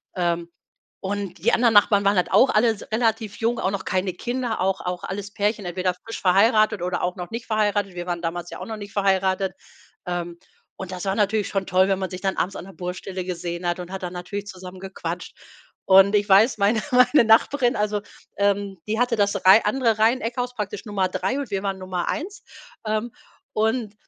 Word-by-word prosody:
Ähm. 170 -1 -1 0.5
Und 195 -1 -4
die 235 - +3
anderen 235 -1 +4
Nachbarn 205 0 +5
waren 200 +1 +4
halt 180 - +1
auch 265 - +6
alles 220 -1 +2
s - - -14
relativ 220 -2 0
jung, 235 +1 0
auch 190 - 0
noch 200 -1 -4
keine 185 0 -1
Kinder, 240 +3 -3
auch 190 +1 0
auch 180 0 -4
alles 200 +1 -5
Pärchen, 210 -1 -1
entweder 180 +1 -1
frisch 225 +6 -9
verheiratet 215 +2 +4
oder 180 0 -2
auch 180 0 -1
noch 180 -2 -7
nicht 230 0 -5
verheiratet. 205 -3 0
Wir 175 0 -5
waren 175 -1 -2
damals 175 +1 -3
ja - - -7
auch - - -6
noch 220 -1 -5
nicht 205 -1 -9
verheiratet. 190 -1 +1 0.5
Ähm, 175 -1 -4 0.4
und 190 -1 -7
das 185 +1 -5
war 195 - +1
natürlich 210 0 +1
schon 195 -1 -2
toll, 185 +1 +3
wenn 195 -1 +1
man 190 -1 -3
sich 185 -1 -7
dann 195 -1 -1
abends 190 +3 -1
an - - -8
der 195 - -12
Baustelle 180 +1 -5
gesehen 175 -1 -4
hat 175 +1 -1
und 180 0 -7
hat 190 - -5
dann 180 0 -4
natürlich 195 +3 -6
zusammen 185 -1 -9
gequatscht. 180 -2 -6 0.5
Und 195 +2 +6
ich 205 0 +2
weiß 210 +6 +5
meine 210 +2 +3
meine 250 +2 +5
Nachbarin, 240 +3 +3
also, 210 0 -1 0.4
ähm, 200 -1 0
die 220 +1 -1
hatte 245 -1 +2
das 200 0 +2
Reih 190 +4 +8
andere 225 0 +1
Reiheneckhaus, 245 +2 +1
praktisch 210 +1 -5
Nummer 200 -3 0
3 190 +7 -2
und 270 -7 -5
wir 195 -1 -1
waren 195 -1 -2
Nummer 185 -2 -3
1, 390 +7 -4 0.5
ähm, 215 +2 -2 0.4
und 220 0 0
200 Hz, 205 wpm, -23 LUFS, 185-220 Hz, 0.5 s, Reih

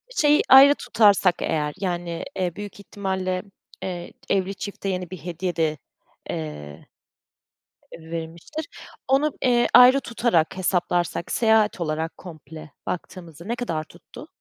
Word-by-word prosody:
Şeyi 295 0 +4
ayrı 275 +2 +9
tutarsak 200 -8 +3
eğer, 150 -2 -1
yani, 175 -3 -3
eee, 180 -3 -2
büyük 205 0 -8
ihtimalle, 190 -2 -3 0.4
eee, 175 -2 -5 0.2
evli 195 0 0
çifte 200 0 -5
yeni 180 -2 -3
bir 185 - -6
hediye 175 0 -4
de, 155 -2 0 0.5
eee, 75 -2 -7 1.1
verilmiştir, 165 - -7 0.4
onu, 280 +3 +3
eee, 240 -2 +3
ayrı 255 +2 +8
tutarak 230 -9 0
hesaplarsak, 175 -2 -1
seyahat 220 -4 +2
olarak 160 +1 -3
komple 155 -3 -11
baktığımızda 170 -2 -7
ne 235 +2 -2
kadar 165 -11 -3
tuttu? - - -14
185 Hz, 120 wpm, -23 LUFS, 165-210 Hz, 1.1 s, ayrı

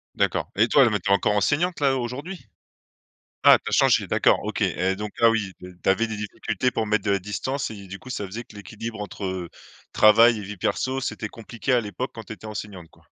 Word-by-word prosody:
D'accord - - 0
et 110 - +4
toi 130 -1 +5
mais 105 - 0
tu 100 - -4
es - - +5
encore 100 +1 +2
enseignante 150 - +1
là 140 -2 +2
aujourd'hui? 140 +10 -6 1.0
Ah, - - +9
tu - - -4
as - - -8
changé, - - +4
d'accord, - - +3
OK - - -4
et 95 +1 +1
donc 105 +1 -5
ah 115 - +7
oui, 110 -4 -1
de 90 -1 -12
tu - - +2
avais 115 +4 +2
des 110 - -4
difficultés 105 +4 -2
pour 110 - -2
mettre 105 -1 +1
de 100 - +1
la 100 - +2
distance 125 +8 -3
et 100 -3 -10
du 100 +1 -8
coup, 130 - -13
ça 105 -5 -3
faisait 110 +5 -7
que - - -18
l'équilibre 110 +2 -7
entre 95 -4 -5 0.4
travail 110 +1 +6
et - - -6
vie 100 +1 -7
perso 130 +8 -1
c'était 105 -4 -4
compliqué 115 +4 -4
à 125 - +4
l'époque 110 +4 -5
quand 115 - -8
tu 110 - -8
étais 110 - -11
enseignante, 105 -4 -7
quoi? - - -24
110 Hz, 230 wpm, -24 LUFS, 100-120 Hz, 1.0 s, Ah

